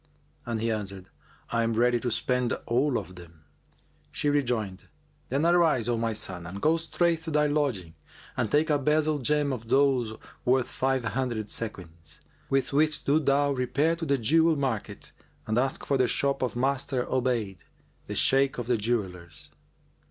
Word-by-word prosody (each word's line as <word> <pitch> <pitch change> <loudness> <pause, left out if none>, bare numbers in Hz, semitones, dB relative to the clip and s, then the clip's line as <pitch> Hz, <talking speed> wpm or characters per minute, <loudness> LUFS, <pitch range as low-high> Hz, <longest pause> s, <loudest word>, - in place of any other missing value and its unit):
and 115 -2 -2
he 115 +1 0
answered, 100 -3 -5 0.4
"I 115 - +1
am 115 0 0
ready 120 +2 +3
to 120 - -2
spend 125 +1 0
all 130 +3 +1
of 90 -3 -6
them." 85 -3 -14 0.7
She 145 - 0
rejoined, 120 -9 -1 0.4
"Then, 140 +5 +1
arise, 165 -9 +3
O 120 - +1
my 115 0 -1
son, 90 -5 -5
and 95 +3 -7
go 160 +8 +3
straight 165 0 0
to 165 - -5
thy 150 -1 +2
lodging 135 - -1 0.4
and 110 - -1
take 150 +4 +2
a 145 - +3
bezel 150 +1 +1
gem 145 +1 +1
of 115 -2 -7
those 130 -4 +2 0.3
worth 125 0 +2
five 130 -1 0
hundred 115 -2 -2
sequins, 85 -8 -7 0.3
with 135 0 0
which 155 +2 +2
do 145 +3 +3
thou 145 -1 +2
repair 140 +5 +1
to 165 0 -5
the 140 0 +2
jewel 160 +7 +4
market 130 -7 -3 0.3
and 110 +2 +1
ask 135 +1 -1
for 140 - +1
the 125 - +4
shop 140 +3 +2
of 125 -2 -1
Master 130 0 0
Obayd, 120 -7 -1 0.4
the - - -6
Shaykh 135 0 +3
of 120 - -3
the 120 0 +1
Jewellers. 95 -8 -3
125 Hz, 170 wpm, -27 LUFS, 110-145 Hz, 0.7 s, jewel